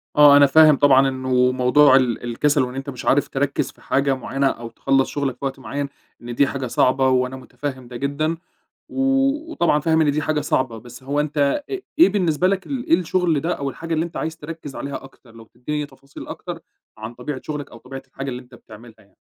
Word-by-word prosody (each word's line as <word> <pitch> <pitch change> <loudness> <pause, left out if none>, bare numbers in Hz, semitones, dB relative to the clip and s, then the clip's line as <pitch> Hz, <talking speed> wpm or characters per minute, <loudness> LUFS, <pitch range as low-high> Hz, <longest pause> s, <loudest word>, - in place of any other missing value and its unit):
آه، 145 -1 +8
أنا 145 - +7
فاهم 155 +1 +6
طبعًا 135 -1 +5
إنه 130 -1 +1
موضوع 130 +2 +5
ال 125 -4 +1
الكسل 145 +5 +1
وإن 125 0 -5
أنت 135 +1 -5
مش 130 -3 -8
عارف 145 - +3
تركّز 140 +1 -1
في - - -25
حاجة 135 0 +1
معينة 135 +1 -1
أو 120 -3 -4
تخلّص 135 +3 +1
شغلك 140 -3 -2
في 140 - -6
وقت 135 0 -4
معين، 140 +1 -4 0.3
إن 120 0 -7
دي 140 - +3
حاجة 135 -1 -4
صعبة 130 +2 +2
وأنا 130 0 +1
متفَهِّم 130 0 -7
ده 120 - -10
جدًا. 145 +5 -1 0.5
و 270 - -5 0.5
وطبعًا 165 - +2
فاهم 160 +2 +2
إن 155 -2 +3
دي 150 +2 -1
حاجة 155 -1 0
صعبة، 130 -5 -1
بس 120 +3 -13
هو 140 +2 -1
أنت 150 0 -3 0.3
أ 395 - -1 0.2
إيه 340 - +8
بالنسبة 180 -4 +1
لك 190 0 -1
ال 265 -3 -4
إيه - - +4
الشغل 175 -3 +1
ده 170 +4 -1
أو 140 -1 -3
الحاجة 165 +4 -5
اللي 160 +1 0
أنت 170 - -9
عايز 160 0 -3
تركّز 160 -3 -9
عليها 140 -1 -6
أكتر؟ 130 -3 -17
لو 115 0 -13
تدّيني 145 +6 -5
تفاصيل 140 0 -13
أكتر - - -7 0.4
عن 110 +2 -7
طبيعة 130 +2 -6
شغلك 150 -2 -5
أو 115 - -12
طبيعة 135 +3 -9
الحاجة 135 +1 -7
اللي 125 0 -6
أنت 125 0 -18
بتعملها 115 0 -14
يعني. 100 -2 -25
140 Hz, 220 wpm, -21 LUFS, 130-150 Hz, 0.5 s, آه